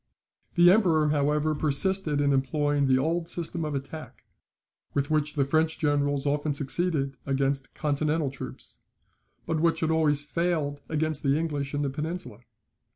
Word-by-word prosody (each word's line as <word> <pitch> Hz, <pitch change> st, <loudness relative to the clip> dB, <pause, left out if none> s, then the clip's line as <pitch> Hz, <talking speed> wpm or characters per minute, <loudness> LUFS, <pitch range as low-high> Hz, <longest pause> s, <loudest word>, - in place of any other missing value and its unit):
The 175 Hz, 0 st, +7 dB
Emperor, 165 Hz, -7 st, +3 dB
however, 150 Hz, +1 st, +1 dB
persisted 150 Hz, +1 st, +1 dB
in 140 Hz, -1 st, +3 dB
employing 145 Hz, +1 st, +1 dB
the 130 Hz, -1 st, +4 dB
old 165 Hz, +5 st, 0 dB
system 170 Hz, -1 st, -2 dB
of 150 Hz, -2 st, -3 dB
attack, 140 Hz, +3 st, -7 dB, 0.7 s
with 140 Hz, +1 st, 0 dB
which 150 Hz, -1 st, 0 dB
the 140 Hz, -2 st, +2 dB
French 160 Hz, +3 st, +1 dB
generals 145 Hz, -2 st, +1 dB
often 145 Hz, 0 st, 0 dB
succeeded 140 Hz, -1 st, 0 dB
against 135 Hz, 0 st, -1 dB
continental 150 Hz, 0 st, 0 dB
troops, 135 Hz, -, -8 dB, 0.7 s
but 160 Hz, -1 st, -1 dB
which 165 Hz, +1 st, +2 dB
had 160 Hz, 0 st, +1 dB
always 150 Hz, -3 st, +2 dB
failed 155 Hz, -4 st, -1 dB
against 155 Hz, -1 st, -1 dB
the 140 Hz, 0 st, +2 dB
English 145 Hz, -3 st, -2 dB
in 145 Hz, -, 0 dB
the 140 Hz, -, 0 dB
Peninsula. 155 Hz, -, -5 dB
150 Hz, 150 wpm, -27 LUFS, 140-160 Hz, 0.7 s, The